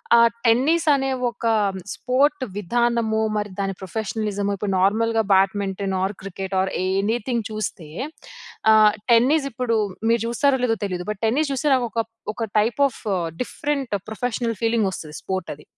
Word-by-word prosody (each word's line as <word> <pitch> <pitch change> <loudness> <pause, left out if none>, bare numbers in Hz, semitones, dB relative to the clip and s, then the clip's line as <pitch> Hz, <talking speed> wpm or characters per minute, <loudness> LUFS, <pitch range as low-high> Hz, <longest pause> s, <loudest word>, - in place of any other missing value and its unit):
ఆహ్, 235 0 +7 0.2
టెన్నిస్ 280 +9 +3
అనే 270 0 -1 0.2
ఒక 235 - -8 0.5
స్పోర్ట్ 275 +2 +1
విధానమో, 230 +2 +1 0.2
మరి 210 0 -2
దాని 195 0 -1
ప్రొఫెషనలిజమో, 205 +1 -2
ఇప్పుడు 195 0 -2
నార్మల్‌గా 225 +4 +2
badminton 195 0 +1
are 195 +2 0
cricket 195 0 -5
or 190 - -1
anything 220 +5 0
చూస్తే 200 -7 -4 0.9
ఆహ్, 215 -1 +7 0.2
టెన్నిస్ 275 +5 +4
ఇప్పుడు 230 0 -1 0.3
మీరు 230 -1 +3
చూస్తారో 265 +2 +2
లేదో 225 -2 +1
తెలియదు. 180 -2 -4
బట్ 210 - -8
టెన్నిస్ 280 +6 +1
చూస్తే 295 +3 0
నాకు 245 -2 0
ఒక, 230 +1 0 0.3
ఒక 225 +1 -3
type 230 +6 0
of - - -14 0.4
different 280 -4 -3 0.2
professional 230 0 -2
feeling 225 -3 +2
వస్తది 155 -4 -8
స్పోర్ట్ 190 -2 -3
అది. 150 - -18
225 Hz, 145 wpm, -23 LUFS, 195-245 Hz, 0.9 s, ఆహ్